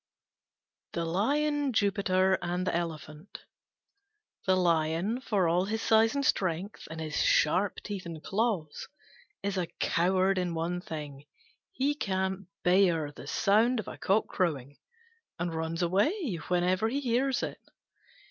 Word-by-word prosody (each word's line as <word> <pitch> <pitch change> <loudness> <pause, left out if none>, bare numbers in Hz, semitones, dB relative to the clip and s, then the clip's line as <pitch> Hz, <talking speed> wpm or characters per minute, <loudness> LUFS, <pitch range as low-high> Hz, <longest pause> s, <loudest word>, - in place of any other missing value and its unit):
THE 170 - -1
LION, 285 - +1
JUPITER, 190 -3 +2
AND 175 +1 -2
THE 185 - 0
ELEPHANT 160 0 -6 1.0
The 185 - +5
Lion, 170 +6 +1
for 200 -8 +1
all 175 +3 +2
his 220 +2 -2
size 225 +3 +4
and 280 -1 0
strength, 185 0 -1
and 160 0 -7
his 155 -1 -4
sharp 185 +6 +2
teeth 195 -4 -5
and 160 -2 -8
claws, 195 -8 -1 0.6
is 200 -1 -1
a 175 - -1
coward 185 +2 +2
in 175 -2 -2
one 170 +2 -2
thing: 150 -4 -7 0.5
he 290 -5 0
can't 190 - -2 0.2
bear 175 -5 +3
the - - -11
sound 225 +5 +3
of 215 - -5
a - - -6
cock 200 +3 +2
crowing, 145 -7 -2 0.6
and 175 0 -2
runs 160 +2 -2
away 205 - +1
whenever 180 +4 +1
he 270 +4 -1
hears 260 0 0
it. - - -5
185 Hz, 140 wpm, -29 LUFS, 165-215 Hz, 1.0 s, The